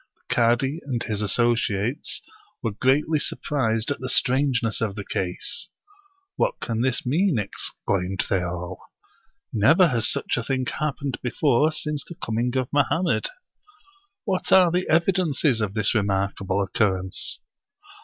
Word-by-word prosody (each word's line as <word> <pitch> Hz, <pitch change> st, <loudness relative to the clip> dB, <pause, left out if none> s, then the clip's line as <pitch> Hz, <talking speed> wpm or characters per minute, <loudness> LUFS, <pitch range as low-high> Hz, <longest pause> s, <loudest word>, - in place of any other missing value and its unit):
The -, -, -5 dB
cadi 120 Hz, +6 st, +2 dB
and 125 Hz, -4 st, -2 dB
his 105 Hz, -1 st, -2 dB
associates 115 Hz, +2 st, 0 dB, 0.4 s
were 115 Hz, -, 0 dB
greatly 140 Hz, +8 st, +2 dB
surprised 115 Hz, -4 st, -1 dB
at -, -, -2 dB
the 130 Hz, -, -4 dB
strangeness 125 Hz, -4 st, +1 dB
of 105 Hz, -4 st, -1 dB
the 100 Hz, -2 st, -6 dB
case. 90 Hz, -2 st, -3 dB, 0.7 s
"What -, -, 0 dB
can 115 Hz, -1 st, -2 dB
this 130 Hz, +1 st, 0 dB
mean?" 160 Hz, +4 st, +2 dB
exclaimed 95 Hz, -2 st, -2 dB
they 95 Hz, -2 st, +1 dB
all. 90 Hz, +1 st, -5 dB, 0.4 s
" -, -, -43 dB
Never 160 Hz, -, +5 dB
has 115 Hz, -4 st, +1 dB
such -, -, -1 dB
a 120 Hz, -, -1 dB
thing 130 Hz, +1 st, -1 dB
happened 145 Hz, -1 st, -3 dB
before 140 Hz, +3 st, +2 dB
since 150 Hz, -1 st, -2 dB
the 170 Hz, -, -10 dB
coming 120 Hz, -3 st, -1 dB
of 130 Hz, +1 st, -2 dB
Mohammed. 165 Hz, -, +1 dB, 1.0 s
What 190 Hz, -4 st, -1 dB
are 185 Hz, -3 st, +7 dB
the 180 Hz, +2 st, 0 dB
evidences 165 Hz, -, +2 dB
of 105 Hz, -1 st, -2 dB
this 110 Hz, -2 st, +1 dB
remark 100 Hz, -2 st, +1 dB
able 100 Hz, +1 st, 0 dB
occurrence?" 95 Hz, -2 st, -1 dB
125 Hz, 145 wpm, -24 LUFS, 105-150 Hz, 1.0 s, are